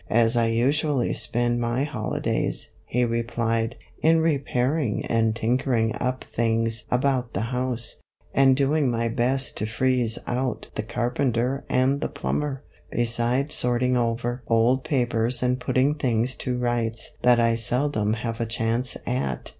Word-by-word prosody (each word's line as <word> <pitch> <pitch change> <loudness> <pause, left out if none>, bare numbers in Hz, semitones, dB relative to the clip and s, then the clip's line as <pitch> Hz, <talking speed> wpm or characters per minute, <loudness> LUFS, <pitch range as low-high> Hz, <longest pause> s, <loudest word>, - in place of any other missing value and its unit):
' - - -25
As 115 +2 +3
I 115 -1 +3
usually 135 +3 +1
spend 120 0 0
my 120 +3 0
holi 130 -7 -3
days,' - - 0 0.2
he 125 +1 +1
replied, 115 0 -1
' - - -29
in 165 +1 +4
repairing 140 -4 0
and 115 -1 +1
tinkering 115 -1 +1
up 130 +1 -1
things 115 -1 0
about 125 -1 0
the 115 +3 -2
house, 125 -2 -2 0.4
and 135 -1 +5
doing 140 0 +2
my 115 -1 0
best 130 +3 0
to 105 - -2
freeze 120 0 +1
out 125 +1 -2
the - - -2
carpenter 125 +1 -1
and 135 +3 +2
the - - -1
plumber, 145 -2 -3 0.3
beside 120 +4 0
sorting 125 +1 +1
over 120 +1 -1
old 120 +3 +3
papers 120 -4 0
and 125 0 +1
putting 130 +3 +2
things 125 -4 0
to 125 -1 -2
rights 120 -2 -1
that 120 -1 +5
I 115 0 +3
seldom 115 -1 0
have 115 0 -3
a 115 - -1
chance 115 +2 -1
at.' 65 -1 -2
120 Hz, 150 wpm, -25 LUFS, 115-130 Hz, 0.4 s, and